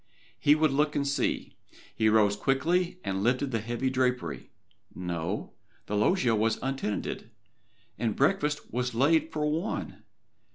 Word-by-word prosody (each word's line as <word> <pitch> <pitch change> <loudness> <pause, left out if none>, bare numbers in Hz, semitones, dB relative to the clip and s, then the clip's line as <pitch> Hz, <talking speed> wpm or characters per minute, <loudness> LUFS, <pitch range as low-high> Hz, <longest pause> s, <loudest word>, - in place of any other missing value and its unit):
He 145 +2 +5
would 155 -1 +2
look 150 +2 +1
and 140 -1 0
see. 140 -1 -1 0.4
He 110 -1 +3
rose 105 -2 +4
quickly 170 - +1
and 95 0 -2
lifted 125 +5 +1
the 115 - 0
heavy 120 +4 -2
drapery. 125 - -1 0.5
No 85 -2 -4 0.3
the 105 - -3
loggia 120 - +3
was 110 +1 +1
untenanted, 130 -5 -3 0.7
and 115 -3 0
breakfast 150 0 0
was 125 0 -1
laid 155 +5 +3
for 150 -1 -1
one! 160 +6 -2
130 Hz, 135 wpm, -28 LUFS, 110-150 Hz, 0.7 s, He